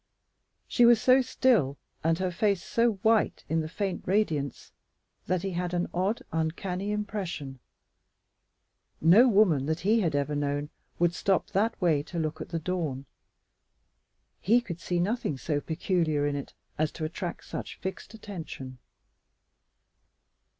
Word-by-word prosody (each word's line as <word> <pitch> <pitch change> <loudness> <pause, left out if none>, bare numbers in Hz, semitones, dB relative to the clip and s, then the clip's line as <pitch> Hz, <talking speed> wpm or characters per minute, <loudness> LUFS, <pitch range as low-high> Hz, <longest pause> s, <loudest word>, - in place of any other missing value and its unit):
She 245 - +3
was 235 -2 +7
so 255 +3 +5
still 230 - +2 0.3
and 165 +1 +2
her 185 0 -1
face 195 0 +1
so 235 0 +2
white 225 -1 +2
in 160 - +1
the 155 - -5
faint 195 +1 -2
radiance 160 - 0 0.6
that 180 0 0
he 195 - -2
had 180 0 -2
an 175 - +1
odd, 190 +6 0
uncanny 180 +5 -2
impression. 190 -10 -4 1.4
No 195 +11 +7
woman 190 - +4
that 160 +1 -1
he 215 +5 +3
had 165 -8 0
ever 145 +1 0
known 145 0 -2 0.3
would 175 0 +2
stop 195 +2 0
that 210 +3 +1
way 165 -6 +3
to 170 +4 -8
look 155 0 -2
at - - -6
the 170 - -2
dawn. 160 -6 -3 1.4
He 230 +6 +4
could 185 -9 -7
see 175 0 -1
nothing 185 - -1
so 145 +2 -1
peculiar 160 -3 0
in 145 -1 0
it 140 - -6 0.2
as 155 -1 +1
to 160 - -4
attract 175 +2 -5
such - - -6
fixed 190 +3 -6
attention. 160 - -8
175 Hz, 145 wpm, -28 LUFS, 155-205 Hz, 1.4 s, was